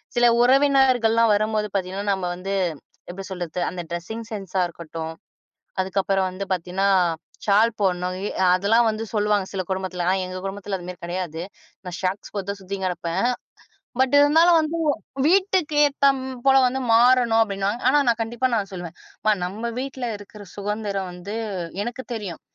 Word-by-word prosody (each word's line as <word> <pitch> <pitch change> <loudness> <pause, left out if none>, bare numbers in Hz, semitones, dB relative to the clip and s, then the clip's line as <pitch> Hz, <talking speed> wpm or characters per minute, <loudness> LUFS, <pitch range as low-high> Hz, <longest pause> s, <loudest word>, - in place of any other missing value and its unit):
சில 240 - +4 0.2
உறவினர்கள்லாம் 250 -4 +4
வரும்போது 215 0 0
பார்த்தீங்கன்னா, 195 +1 -2
நம்ம 190 -2 -3
வந்து 195 +2 -4 0.6
எப்பிடி 190 +2 -7
சொல்றது? 180 -1 -4
அந்த 180 -1 -5
ட்ரெஸ்ஸிங் 220 +7 -5
சென்ஸா 195 -3 -2
இருக்கட்டும். 165 -1 -7 0.7
அதுக்கு 190 +1 0
அப்புறம் 195 0 +1
வந்து 195 +2 -5
பாத்தீங்கன்னா, 185 +2 -1 0.6
சால் 210 +3 +5
போட்ணும். 180 -2 0 0.4
அதெல்லாம் 225 +5 +3
வந்து 220 0 -1
சொல்லுவாங்க. 210 -2 +1
சில 195 - -2
குடும்பத்துலலாம். 185 -2 -2
ஆனா 190 -1 0
எங்க 185 0 -6
குடும்பத்துல 195 0 -4
அதுமாரி 180 0 -8
கிடையாது. 175 -2 -4 0.4
நான் 180 -1 -5
ஷார்ட்ஸ் 190 +1 -3
போட்டு 200 -1 -3
சுத்திக்கின்னு 190 0 -3
கிடப்பேன். 175 +4 -1 0.7
பட் 265 +1 +3
இருந்தாலும், 325 +4 +6
வந்து 315 +1 -2 0.5
வீட்டுக்கு 370 -4 +2
ஏத்த 280 -1 +3 0.4
போல 270 - +6
வந்து 260 +2 -1
மாறணும் 240 -1 +5
அப்பிடின்னா 200 -2 -1 0.2
ஆனா, 295 - +5
நான் 235 -1 +2
கண்டிப்பா 240 +3 -1
நான் 200 -1 -2
சொல்லுவேன். 175 -2 -7 0.5
நம்ம 220 +6 -4
வீட்டுல 260 -2 -4
இருக்குற 205 +1 -12
சுதந்திரம் 200 -2 -3
வந்து 180 +4 -7 0.5
எனக்குத் 245 +1 -6
தெரியும். 200 -7 -6
200 Hz, 145 wpm, -23 LUFS, 185-235 Hz, 0.7 s, இருந்தாலும்